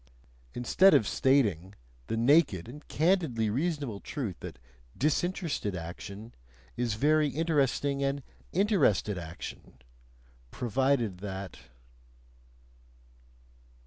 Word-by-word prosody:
instead 185 +10 +5
of 105 - +3
stating 105 - +2 0.3
the 115 - -2
naked 120 - +3
and 145 +5 -11
candidly 150 - +1
reasonable 140 - -2
truth 115 - -4
that - - -8 0.4
"disinterested" 155 - -1
action 100 +6 -8 0.4
is 120 -2 -1
very 150 +5 +3
interesting 140 -2 0
and 140 0 -1 0.3
"interested" 155 - +2
action, 85 -5 -9 0.7
provided 120 - 0
that... 95 -1 -6
130 Hz, 85 wpm, -29 LUFS, 105-150 Hz, 0.7 s, instead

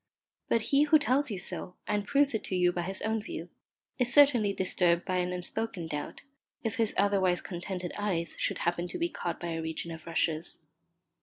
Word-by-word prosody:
But 230 - +3
he 285 +2 +6
who 310 +1 +6
tells 280 -1 +1
you 205 - -3
so, 180 0 -5
and 205 -1 -1
proves 280 -1 +3
it 220 - -1
to 185 - -2
you 180 -1 +3
by 175 - -2
his 190 +2 -4
own 220 0 0
view, 210 - -7 0.5
is 245 -1 +2
certainly 250 -7 +6
disturbed 180 -3 +1
by 185 -1 0
an 180 0 0
unspoken 180 +1 -3
doubt, 150 -2 -5 0.4
if 225 +2 -2
his 225 -3 +1
otherwise 195 -3 +3
contented 180 0 -5
eyes 180 -5 -1
should - - 0
happen 175 0 -1
to - - -5
be 340 0 0
caught 175 - -4
by 175 - -4
a 165 -1 -2
region 160 +1 -4
of 160 0 -9
rushes. 165 -1 -1
190 Hz, 200 wpm, -30 LUFS, 175-225 Hz, 0.5 s, he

